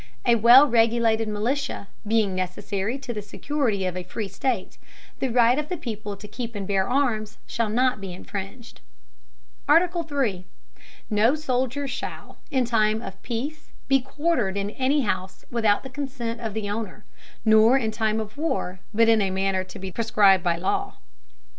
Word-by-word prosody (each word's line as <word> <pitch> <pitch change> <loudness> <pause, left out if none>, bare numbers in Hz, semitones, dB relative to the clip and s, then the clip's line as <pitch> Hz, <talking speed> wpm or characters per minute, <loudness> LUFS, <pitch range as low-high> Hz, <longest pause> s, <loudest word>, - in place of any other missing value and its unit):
A 240 - +5
well 235 +5 +8
regulated 225 -2 +3
Militia, 225 +2 -2 0.2
being 215 -3 +2
necessary 195 +5 -2
to 270 -3 -6
the 210 - -4
security 215 -1 -2
of 185 -1 -2
a 185 - -3
free 195 +4 -5
State, 230 -2 -3 0.4
the 265 - 0
right 240 +2 +4
of 300 - -4
the 360 - -2
people 215 -7 -5
to 210 - -10
keep 235 0 -6
and 200 -1 -4
bear 195 0 +1
Arms, 245 -5 0
shall 230 -2 -1
not 250 0 +1
be 195 -2 -6
infringed. 200 +5 -8 0.9
III. 295 - +2 0.7
No 220 +6 +4
Soldier 265 -1 -1
shall, 265 0 -6
in 260 -4 +1
time 220 -2 +2
of 190 0 -9
peace 270 +6 -5
be 270 -1 +4
quartered 270 - -1
in 200 +1 -2
any 270 +5 +1
house, 190 -5 -3
without 220 -4 +2
the 265 - -7
consent 255 -4 -4
of 220 -3 -4
the 215 -2 -2
Owner, 210 0 -5 0.4
nor 220 +3 +6
in 225 -4 -1
time 220 0 0
of 215 +3 -6
war, 265 - -2
but 225 +1 +3
in 225 -1 +5
a 195 - +1
manner 190 0 0
to 185 - -10
be 190 0 -6
prescribed 205 -4 +4
by 170 -2 +2
law. 175 +3 -2
225 Hz, 165 wpm, -24 LUFS, 200-260 Hz, 0.9 s, well